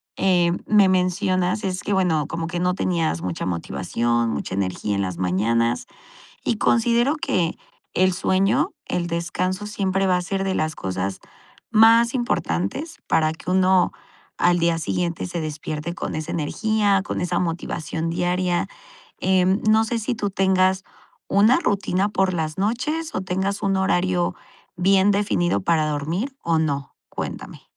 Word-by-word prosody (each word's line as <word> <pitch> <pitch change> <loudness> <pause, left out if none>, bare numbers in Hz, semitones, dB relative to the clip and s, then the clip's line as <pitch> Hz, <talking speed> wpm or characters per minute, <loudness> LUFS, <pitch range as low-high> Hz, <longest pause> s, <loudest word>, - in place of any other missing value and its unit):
em, 175 -2 +2
me 205 -2 +5
mencionas 185 +2 +1
es 185 -1 -2
que, - - -3
bueno, 165 -6 +1
como 165 0 -4
que 175 0 -3
no 180 +1 +1
tenías 165 - 0
mucha 90 -1 -3
motivación, 115 +6 -1
mucha - - -4
energía 100 +2 -2
en 100 - 0
las 90 -2 -3
mañanas, 115 +6 0 0.6
y 230 - +1
considero 235 +7 +2
que 185 - 0 0.4
el 185 0 +3
sueño, 195 - +1
el 175 -1 -1
descanso 180 +3 -2
siempre 195 -2 0
va 180 - +3
a - - -3
ser 195 +2 -2
de 190 -1 -1
las 155 -2 -1
cosas 95 +1 -3 0.5
más 230 +1 +6
importantes 240 - -2
para 155 -1 +2
que 160 +3 -7
uno 185 0 +3 0.5
al 175 0 +3
día 170 -1 +2
siguiente 170 +1 -2
se 175 -1 -4
despierte 155 +1 -4
con - - -4
esa 155 +1 -4
energía, 200 +5 +1
con - - -3
esa 180 0 0
motivación 165 -1 -3
diaria. 175 +1 0 0.5
Em, 190 +2 +2
no 220 +1 +5
sé 230 +1 -2
si, 235 +3 -2
tú 205 -3 -2
tengas 190 0 +2 0.4
una 215 +6 +4
rutina 200 - 0
por 190 -2 +1
las 155 -2 -2
noches, 280 +11 -1
o 185 - -1
tengas 190 +2 -2
un 195 -1 +1
horario 180 -2 +1 0.4
bien 195 +2 +4
definido 175 - +1
para 160 - +2
dormir 165 - -2
o 165 -1 +1
no. 140 -3 -2
Cuéntame. - - -6
180 Hz, 150 wpm, -22 LUFS, 160-200 Hz, 0.6 s, más